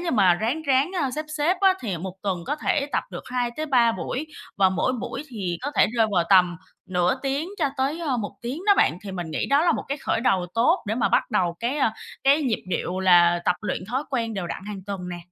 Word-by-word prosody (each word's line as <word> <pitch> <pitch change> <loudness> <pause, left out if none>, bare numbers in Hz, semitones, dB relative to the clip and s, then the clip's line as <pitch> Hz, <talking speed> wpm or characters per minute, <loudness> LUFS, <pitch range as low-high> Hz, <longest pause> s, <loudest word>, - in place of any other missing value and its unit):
như 350 -1 -2
mà 195 -7 +4
ráng 230 - -2
ráng, 275 +2 +2
a, 275 -3 0
xếp 305 +4 -4
xếp 320 +5 +2
á, 385 -1 +5
thì 200 -7 -3
1 185 +2 -6
tuần 185 -4 -2
có 295 - -1
thể 290 -1 0
tập - - 0
được - - -7
2-3 245 -1 +1
buổi, 270 +6 -4 0.3
và 190 -1 +5
mỗi 190 +7 0
buổi 255 +2 -4
thì 190 -8 -4
có 285 - -2
thể - - +6
rơi 225 -1 +4
vào 175 -2 +3
tầm 180 -2 +5 0.3
nửa 180 +1 +1
tiếng 280 +4 -1
cho 295 -5 +2
tới, 275 +5 -1
ơ, 290 -7 0
1 210 -3 -4
tiếng 245 +5 -4
đó 405 - +7
bạn. 160 - +3
Thì 195 - -6
mình 175 -3 -5
nghĩ 155 - -2
đó 280 +3 +3
là 340 - +4
một - - -2
cái 280 +2 -2
khởi - - -1
đầu 190 -7 +2
tốt 250 +11 +3
để 210 - 0
mà 235 - +1
bắt - - +1
đầu 170 -2 +1
cái, 240 +5 -1
a, 230 -6 +2 0.3
cái 285 +3 +5
nhịp 245 -6 -1
điệu 180 +1 -2
là 175 -2 +5
tập 180 - +2
luyện 210 -3 -3
thói 260 +5 -1
quen 230 -4 -1
đều 190 -3 -3
đặn 170 - -6
hàng 205 -2 -6
tuần 190 -3 -5
nè. 175 -1 -5
230 Hz, 250 wpm, -24 LUFS, 185-280 Hz, 0.3 s, đó